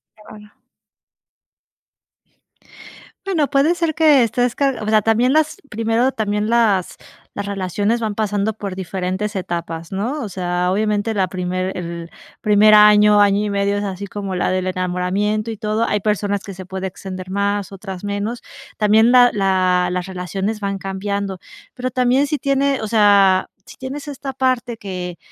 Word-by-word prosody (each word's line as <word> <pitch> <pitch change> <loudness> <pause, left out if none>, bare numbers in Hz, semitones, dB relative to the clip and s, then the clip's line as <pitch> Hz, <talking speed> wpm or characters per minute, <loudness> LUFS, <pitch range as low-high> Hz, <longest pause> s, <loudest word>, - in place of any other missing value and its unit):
Qué 215 - -21
bueno. 210 0 -14 2.7
Bueno, 335 -7 +1
puede 285 +5 +3
ser 335 -2 -1
que 300 -5 +5
estés 245 +2 0
car 275 -4 0
o 210 - -5
sea, 215 0 +4
también 225 +5 +2
las 310 0 +1
primero 225 +4 +1
también 210 -3 -2
las 220 -6 +2 0.4
las 200 - -4
relaciones 200 +3 -1
van 220 -3 -3
pasando 210 0 -1
por 200 -3 -6
diferentes 190 +3 -3
etapas, 170 -3 -4
¿no? 235 +10 -2
O 215 - -5
sea, 180 -1 -1
obviamente 210 +2 0
la 195 -3 +1
primer 185 +1 -3
el 170 -1 -6 0.3
primer 210 0 +5
año, 210 0 +7
año 205 0 +3
y - - -2
medio 200 0 0
es 205 - -2
así 200 0 -5
como 195 -1 -5
la 180 - 0
del 185 0 -1
enamoramiento 185 +4 -1
y 220 - -7
todo. 215 +1 -1
Hay 210 - 0
personas 205 -1 -1
que 195 - -8
se 185 0 -9
pueden 190 +1 -5
extender 185 0 -7
más, 200 +1 -1
otras 190 -1 -8
menos. 205 +4 -3 0.4
También 220 +2 +4
la 250 -1 +7
la 185 -2 +2
las 180 0 -2
relaciones 190 +3 -4
van 200 -1 -2
cambiando, 195 0 -4 0.4
pero 255 0 -3
también 255 +2 +2
si 295 +1 -2
tiene, 275 0 +1
o 220 - -3
sea, 200 -3 +4 0.2
si - - -14
tienes 275 +3 -7
esta 275 -1 -6
parte 255 -2 -1
que 180 -4 -6
205 Hz, 165 wpm, -19 LUFS, 190-225 Hz, 2.7 s, año